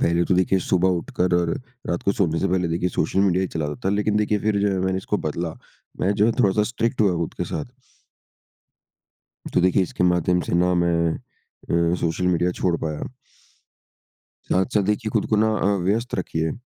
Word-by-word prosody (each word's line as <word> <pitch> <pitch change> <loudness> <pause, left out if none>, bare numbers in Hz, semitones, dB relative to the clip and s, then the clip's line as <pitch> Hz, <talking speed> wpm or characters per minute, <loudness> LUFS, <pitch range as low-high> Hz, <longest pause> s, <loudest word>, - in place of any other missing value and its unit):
पहले 85 +1 +2
तो 90 - +1
देखिए 95 +1 +2
सुबह 90 +1 +2
उठकर 90 +1 -1
और 85 -1 +2 0.4
रात 85 - -2
को 100 - +2
सोने 85 -5 0
से 95 - +1
पहले 90 -1 0
देखिए 85 +2 0
सोशल 95 - 0
मीडिया 95 -2 +2
ही 95 - -1
चलाता 75 -2 -2
था - - +2
लेकिन 105 0 +1
देखिए 105 0 +1
फ़िर 105 0 0
जो 100 - +2
है 95 - -1
मैंने 95 0 0
इसको 100 +2 -2
बदला। 80 +2 -3 0.5
मैं 95 +3 +2
जो 105 - +3
है 115 - +3
थोड़ा-सा 105 -1 +3
स्ट्रिक्ट 115 +2 -2
हुआ 100 -4 +3
खुद - - -9
के - - -1
साथ। 75 - -4 1.9
तो - - +3
देखिए 90 +1 +3
इसके 90 - -3
माध्यम 90 0 +2
से - - -4
ना 90 +1 +3
मैं 85 -1 +2 0.2
अ, 85 0 -3
सोशल 90 +1 -1
मीडिया 90 0 +2
छोड़ 90 -2 +2
पाया। 75 -2 -3 1.5
साथ-साथ 100 +3 +2
देखिए 110 +1 -2
खुद - - +1
को 110 - +3
ना 110 +1 +3
अ, 100 +1 +2
व्यस्त 115 +4 -1
रखिए। 80 -3 -2
90 Hz, 195 wpm, -23 LUFS, 85-100 Hz, 1.9 s, जो